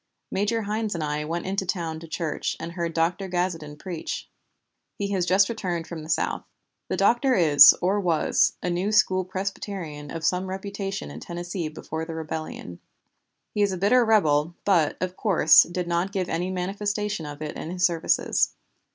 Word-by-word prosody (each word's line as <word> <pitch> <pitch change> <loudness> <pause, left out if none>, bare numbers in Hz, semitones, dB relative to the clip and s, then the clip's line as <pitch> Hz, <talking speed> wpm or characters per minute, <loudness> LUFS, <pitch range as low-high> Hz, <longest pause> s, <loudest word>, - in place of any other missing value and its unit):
Major 215 +3 0
Hynes 215 0 -2
and 165 - -2
I 150 0 -2
went 170 +2 -3
in 190 +1 -2
town 170 -4 -2
to 165 - -10
church, 160 -1 -3
and 165 +1 -5
heard 170 -1 -3
Dr. 170 +4 0
Gazeton 170 -5 -2
preach. 175 0 -5 0.7
He 200 -1 -3
has 185 -3 0
just 190 +2 +4
returned 180 -7 -3
from 165 -1 -7
the 155 - -10
South. 155 - 0 0.4
The - - -2
Doctor 240 +6 +3
is 155 -6 +8
(or 195 +3 +2
was) 170 -5 +2
a 180 - 0
New 180 +4 -1
School 190 -3 +3
Presbyterian 185 -5 -5
of 165 +1 -5
some 185 +1 +1
reputation 195 - -5
in 75 - -8
Tennessee 175 - -5
before 160 +1 -6
the 165 -1 -6
rebellion. 155 - -6 0.7
He 210 - 0
is 200 -1 +3
a - - -3
bitter 210 +7 +4
rebel, 165 -8 +3
but, 170 -7 +3
of 185 0 -3
course, 180 -8 +6
did 180 0 -3
not 175 +3 0
give 190 -3 -2
any 175 +3 -1
manifestation 200 0 -2
of 145 0 -8
it 150 - -5
in - - -6
his 180 +1 +1
services. 170 -2 +1
180 Hz, 175 wpm, -25 LUFS, 160-195 Hz, 0.7 s, is